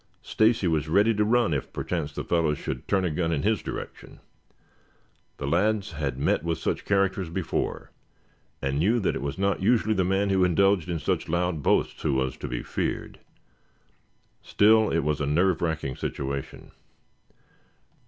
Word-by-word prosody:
Stacy 110 -3 +2
was 80 -2 0
ready 100 +7 +4
to 105 0 +1
run 115 -4 +2
if, 70 - -3
perchance, 80 -5 -3
the - - -5
fellow 80 -3 +1
should 65 -3 -6
turn 95 -2 +1
a 85 - 0
gun 80 +1 -1
in 75 -4 -1
his 105 -3 +1
direction. - - -8 1.2
The - - -5
lads 100 +7 +1
had 75 -5 -3
met 70 - +1
with 85 -1 -1
such - - -3
characters 95 -2 +1
before, 85 0 -3 0.7
and 70 +1 0
knew 110 +9 +2
that 100 - 0
it - - -4
was 70 0 -4
not 100 0 0
usually 110 +1 +2
the 95 -3 +1
man 95 +2 +1
who 95 -1 +3
indulged 90 0 +2
in 85 - -1
such 80 - -2
loud 85 -1 0
boasts - - +1
who 70 - 0
was 65 -1 -1
to - - -6
be - - -4
feared. - - -3 1.2
Still, 110 +1 +4
it 80 - 0
was 75 -1 -1
a 70 - 0
nerve 85 +4 +2
racking 80 -6 -2
situation. 70 -1 -5
85 Hz, 170 wpm, -26 LUFS, 75-100 Hz, 1.2 s, ready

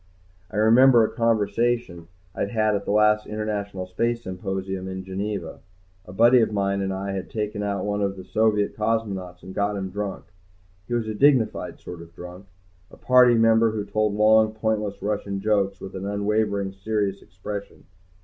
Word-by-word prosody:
I 105 - -6
remembered 115 +2 +6
a - - -5
conversation 115 -5 0 0.3
I'd 100 - -2
had 110 -2 +1
at 100 - -3
the - - -2
last 105 0 +3
International 105 -3 -4
Space 115 +6 -2
Symposium 95 0 -4
in 95 0 -5
Geneva. 95 -2 -5 0.5
A - - -11
buddy 120 +6 +5
of 110 - +1
mine 100 -1 0
and 95 0 -2
I 95 +1 -3
had 95 -1 -5
taken 105 -1 -3
out 100 -1 -2
one 105 0 -1
of 100 -1 -1
the 95 - -9
Soviet 105 +2 +1
cosmonauts 100 -5 -2
and 95 - -9
got 100 +1 -1
him 95 -1 -4
drunk. 100 0 -5 0.6
He 120 - -2
was 115 -2 -1
a 110 - -3
dignified 130 -1 +2
sort 90 -1 -9
of 85 0 -14
drunk, 90 +2 -10 0.4
a - - -16
Party 125 -1 +5
member 115 0 +4
who 105 -2 -3
told 110 -1 0
long, 110 +1 +4
pointless 105 -2 -2
Russian 100 -1 -2
jokes 100 -1 0
with 95 - -9
an 95 +1 -5
unwavering, 100 -1 -1
serious 100 0 -2
expression. 100 +3 -8
105 Hz, 175 wpm, -24 LUFS, 95-110 Hz, 0.6 s, remembered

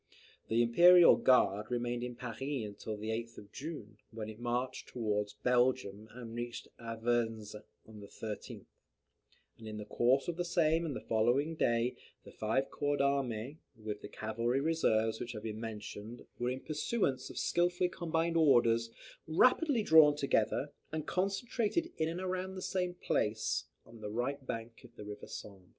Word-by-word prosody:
The 115 +1 +3
Imperial 175 +9 +8
Guard 105 -5 +3
remained 120 0 -1
in 125 -1 -5
Paris 120 -2 -7
until 110 -6 -4
the 110 +1 -5
8th 115 +1 -4
of 100 0 -12
June, 135 -9 -7
when 110 -2 -6
it 110 +1 -10
marched 125 +2 -2
towards 105 -3 -2
Belgium, 120 -3 +1
and 120 -2 -8
reached 120 0 -5
Avesnes 115 -2 -1 0.3
on 110 -1 -12
the 100 - -10
13th; 110 0 -7 0.9
and 110 - -10
in 110 0 -6
the 105 - -6
course 125 +5 +2
of 170 -1 -3
the 175 - 0
same 165 -1 +2
and 145 - -3
the - - -5
following 120 +8 +2
day, 120 -4 +1 0.3
the - - -12
five 110 +5 -1
corps 145 0 0
d'armee 140 -1 0 0.2
with 105 -1 -5
the - - -7
cavalry 115 +4 -1
reserves 115 -8 +1
which 120 0 -5
have 105 -1 -7
been 110 -1 -4
mentioned, 110 +1 -7
were, 120 0 0
in 130 +1 -3
pursuance 150 - -1
of - - -10
skilfully 175 +1 +2
combined 165 -1 -1
orders, 115 -7 +4 0.4
rapidly 250 - +4
drawn 155 -4 +7
together, 140 0 +1 0.2
and 155 -1 -3
concentrated 220 - -1
in 160 - +1
and 170 +2 -4
around 185 0 -3
the 185 - -6
same 180 -1 -1
place, 110 -9 0 0.2
on 115 - -14
the 105 - -4
right 130 +5 -3
bank 115 0 -5
of 120 -1 -16
the 105 - -9
river 105 0 -8
Sambre. 95 -3 -9
120 Hz, 165 wpm, -33 LUFS, 110-155 Hz, 0.9 s, Imperial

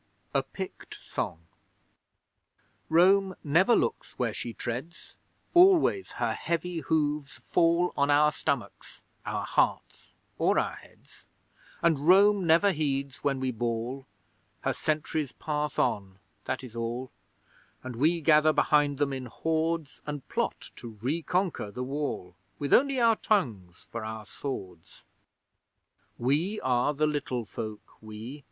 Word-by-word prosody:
A - - +3
PICT - - -8
SONG 80 +1 -5 1.4
Rome 190 +3 +4
never 175 +10 +4
looks - - -1
where 120 -4 0
she 120 - -5
treads, 125 +9 -6 0.4
Always 375 +1 +5
her - - -1
heavy 170 0 -2
hooves 150 -1 0
fall 170 +1 +1
On 140 0 +2
our 150 +1 +5
stomachs, 130 - -4 0.2
our - - -2
hearts - - -1 0.3
or - - +3
our - - +1
heads; - - -18 0.6
And 160 -3 +2
Rome 195 0 +6
never 170 +5 +5
heeds 140 -4 -2
when 135 -2 +1
we 130 -1 -1
bawl. 120 +3 -3 0.5
Her - - 0
sentries 155 -2 -2
pass 150 -1 -3
on 100 -6 0 0.3
that 130 0 -3
is 120 -3 -10
all, 120 +2 -4 0.7
And 130 -1 -6
we 160 +7 +2
gather 155 0 +5
behind 145 -2 +3
them 140 -1 0
in 130 -1 -5
hordes, 160 +3 -2
And 145 -2 -5
plot - - -2
to 115 -3 -9
reconquer 165 - -1
the 125 +5 -5
Wall, 135 -10 -4 0.2
With 140 -1 -1
only 275 0 +4
our 230 -2 +4
tongues 110 - -1
for 115 -1 -4
our 110 0 -6
swords. 95 - -7 1.1
We 155 - 0
are 130 +3 +1
the 155 +2 +2
Little 140 -5 -2
Folk 105 0 -8
we! 110 +6 -8
145 Hz, 130 wpm, -28 LUFS, 125-165 Hz, 1.4 s, Rome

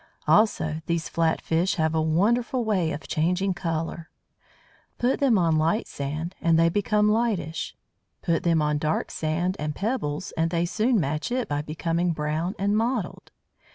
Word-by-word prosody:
Also, 160 -8 +3
these 170 -1 -1
flat 165 -1 +1
fish 170 +4 0
have 160 -3 +1
a 160 - +2
wonderful 230 +10 +1
way 185 -7 +1
of 155 - -6
changing 180 +5 +1
colour. 165 -1 -3 0.9
Put 245 +2 +1
them 260 -6 +4
on 165 -3 +3
light 165 +9 +1
sand, 150 +5 -4
and 165 -1 +3
they 165 0 +5
become 210 +3 +2
lightish. 210 -8 -1 0.5
Put 165 -1 +1
them 165 -3 +2
on 150 0 +1
dark 155 +1 -1
sand 170 +4 -1
and 150 -1 -3
pebbles, 195 - -2
and 165 0 +1
they 170 0 0
soon 220 +6 +1
match 155 +5 -2
it 250 -1 -1
by 145 0 -1
becoming 165 +3 -1
brown 155 +4 -2
and 200 +1 +1
mottled. 225 -3 -1
170 Hz, 160 wpm, -25 LUFS, 160-205 Hz, 0.9 s, they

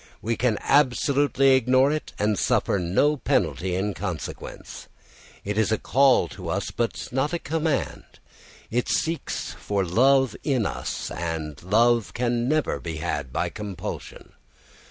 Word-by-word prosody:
We 115 +1 -1
can 115 -2 +1
absolutely 140 0 +3
ignore 130 +2 +4
it 155 0 -3
and 105 -1 +1
suffer 100 - +1
no 100 - +2
penalty 90 - 0
in 100 +2 -1
consequence. 95 -6 -6 0.6
It 105 +2 -1
is 110 - +2
a 110 - +2
call 135 +3 +3
to 90 -4 -8
us, 95 +4 -2
but 120 -1 -3
not 135 +5 0
a - - +1
command. 160 -2 -2 0.7
It 120 +2 0
seeks 165 0 -2
for 100 -2 -2
love 130 +6 +3
in 130 -7 +1
us, - - -4
and 80 -3 -4
love 115 +4 +2
can 120 0 0
never 155 0 0
be 80 -2 -5
had 75 -5 -3
by - - -1
compulsion. 100 -4 -7
115 Hz, 140 wpm, -25 LUFS, 95-135 Hz, 0.7 s, ignore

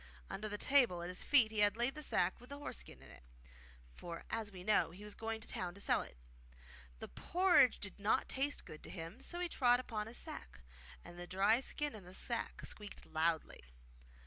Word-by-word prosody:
Under 215 +2 -3
the 205 - -2
table 235 -10 +4
at 175 - -4
his 180 - -3
feet 240 -7 +5
he 215 - -2
had 205 +1 +4
laid 240 +3 +2
the 305 - -6
sack 185 -8 +1
with 245 - -14
the 280 - -6
horse 290 - -5
skin - - -11
in - - -13
it, - - -14 0.7
for, 170 - -7
as 220 -2 -2
we 185 -2 -9
know, 210 -3 +3
he 185 +5 -11
was 210 0 -6
going 225 0 -3
to - - -5
the - - -3
town 175 -1 -3
to - - -12
sell - - +3
it. - - -10 0.8
The - - -7
porridge 350 - +4
did 205 0 -7
not 205 +2 +2
taste 280 +2 0
good 155 - -10
to - - -10
him, 170 +7 -7
so 350 - -3
he 355 - 0
trod 245 -6 +4
upon 220 -4 -4
his 230 - -7
sack, - - -7 0.4
and 175 0 -10
the 175 - -6
dry 200 +6 +3
skin 295 +2 -3
in 215 -3 -9
the 180 +1 -9
sack 235 +3 -2
squeaked 210 -1 -7
loudly. 160 0 0
210 Hz, 225 wpm, -37 LUFS, 180-245 Hz, 0.8 s, feet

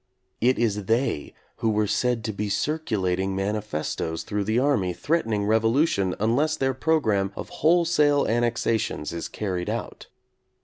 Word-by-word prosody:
It 125 +3 +3
is 105 -3 0
they 115 - 0 0.3
who 115 - 0
were 105 0 +2
said 120 +2 0
to 110 -1 -3
be 105 +1 -3
cir 150 +10 0
culating 95 - -1
manifestoes 95 -5 -2
through 105 -1 -2
the 110 +3 +1
army 125 -9 +2
threatening 115 - 0
revolution 110 - +2
unless 140 +9 +1
their 135 -2 +1
programme 110 -10 +1
of - - -7
wholesale 155 -3 +4
annexations 115 -8 0
is 85 - -4
carried 95 -4 -3
out. - - -5
110 Hz, 140 wpm, -25 LUFS, 100-135 Hz, 0.3 s, wholesale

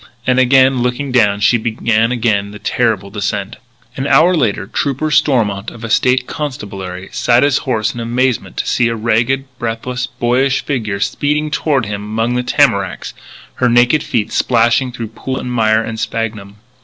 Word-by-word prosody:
And, 130 0 +2
again 130 0 +4
looking 125 +3 -2
down, 105 -5 +2
she 120 +3 +3
began 115 0 0
again 110 -5 0
the 105 - -9
terrible 105 -3 -1
descent. 100 +1 -3 0.4
An 135 +1 -3
hour 155 +6 +5
later, 115 -10 0
Trooper 140 +8 -2
Stormont 110 -10 +1
of 115 - -13
the 115 -2 -5
State 125 +1 +2
Constabulary, 100 - -6
sat 120 +2 +2
his 145 -1 +2
horse 110 -4 0
in 120 - -7
amazement 120 +2 -1
to - - -1
see 120 - +1
a 115 - -1
ragged, 115 +4 0
breathless, 125 +2 -3
boyish 125 +2 0
figure 110 -8 -2
speeding 150 +7 -1
toward 140 -6 0
him 105 -1 -4
among 115 +3 -1
the 125 - 0
tamaracks, 125 - 0 0.5
her 125 - +4
naked 120 +5 +4
feet 110 -4 -2
splashing 120 +2 +2
through 115 -3 -6
pool 130 +4 -5
and 125 - -5
mire 110 -1 +2
and 110 0 -5
sphagnum. 105 -3 -4
120 Hz, 170 wpm, -16 LUFS, 110-130 Hz, 0.5 s, hour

